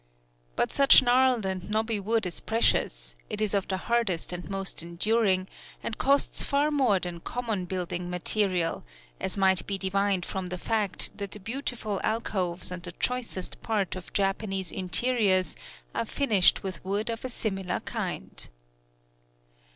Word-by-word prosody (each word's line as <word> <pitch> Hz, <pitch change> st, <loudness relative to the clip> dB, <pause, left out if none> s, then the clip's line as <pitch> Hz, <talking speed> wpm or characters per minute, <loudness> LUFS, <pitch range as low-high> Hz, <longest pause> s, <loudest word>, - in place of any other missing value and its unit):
But -, -, 0 dB
such 275 Hz, -1 st, +7 dB
gnarled 250 Hz, -3 st, +4 dB
and 190 Hz, 0 st, -3 dB
knobby 220 Hz, 0 st, 0 dB
wood 220 Hz, +2 st, +1 dB
is 180 Hz, -, -3 dB
precious: -, -, +1 dB
it 210 Hz, -, -3 dB
is 215 Hz, -2 st, 0 dB
of 200 Hz, -1 st, +1 dB
the 190 Hz, -, -1 dB
hardest 195 Hz, -6 st, 0 dB
and 175 Hz, +1 st, -6 dB
most 195 Hz, -2 st, -1 dB
enduring, 185 Hz, +2 st, +1 dB, 0.4 s
and 225 Hz, -, -2 dB
costs 280 Hz, +1 st, +2 dB
far 290 Hz, +2 st, +2 dB
more 260 Hz, -10 st, +3 dB
than 175 Hz, -1 st, -5 dB
common 220 Hz, -2 st, -3 dB
building 180 Hz, -1 st, -3 dB
material, 180 Hz, -1 st, +1 dB, 0.4 s
as 190 Hz, -, -2 dB
might 190 Hz, -1 st, +3 dB
be 195 Hz, -, -1 dB
divined 195 Hz, -1 st, +1 dB
from 190 Hz, -1 st, -4 dB
the 180 Hz, 0 st, -4 dB
fact 210 Hz, 0 st, 0 dB
that 200 Hz, -1 st, -6 dB
the 210 Hz, -, -7 dB
beautiful 225 Hz, -2 st, -3 dB
alcoves 185 Hz, -5 st, -1 dB
and 180 Hz, -1 st, -5 dB
the 175 Hz, 0 st, -5 dB
choicest 240 Hz, -5 st, -3 dB
parts 205 Hz, -5 st, -1 dB
of 185 Hz, -, -8 dB
Japanese 195 Hz, -1 st, -1 dB
interiors 190 Hz, 0 st, +2 dB, 0.4 s
are -, -, -1 dB
finished 215 Hz, -8 st, +3 dB
with 190 Hz, -3 st, -5 dB
wood 200 Hz, +4 st, -1 dB
of 230 Hz, -, -5 dB
a 255 Hz, -, -3 dB
similar 195 Hz, -6 st, -2 dB
kind. -, -, -5 dB
195 Hz, 150 wpm, -28 LUFS, 185-225 Hz, 0.4 s, such